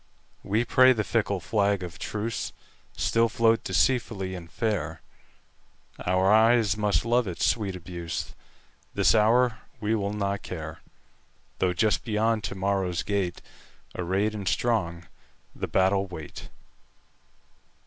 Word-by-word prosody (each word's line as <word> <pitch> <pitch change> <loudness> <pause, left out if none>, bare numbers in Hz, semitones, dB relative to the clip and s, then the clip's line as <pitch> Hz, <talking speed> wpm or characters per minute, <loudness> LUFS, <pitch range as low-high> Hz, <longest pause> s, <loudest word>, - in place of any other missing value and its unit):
We 110 +4 0
pray 130 +1 +6
the 110 -3 -1
fickle 100 -3 0
flag 100 -1 0
of 85 -1 -8
truceStill 115 +1 -2
float 115 -1 +2
deceitfully 95 -1 0
and 85 -2 -9
fair; 85 -9 -2 1.1
Our 95 +2 +3
eyes 110 -1 +4
must 105 +1 +1
love 120 -1 +2
its 90 - -1
sweet 100 -5 0
abuse; 85 -2 -5 0.6
This - - +4
hour 115 +1 +3 0.2
we 110 0 0
will 100 -2 -1
not 100 -1 -2
care, 80 -2 -7 0.8
Though 90 -1 +2
just 105 +3 +1
beyond 110 -1 0
to 95 - -4
morrow's 95 -2 -1
gate, 95 -4 -2 0.5
Arrayed 95 +4 0
and 100 -3 -5
strong, 95 -5 0 0.5
the - - -4
battle 95 +1 +2
wait. 80 -5 -9
100 Hz, 120 wpm, -26 LUFS, 90-110 Hz, 1.1 s, pray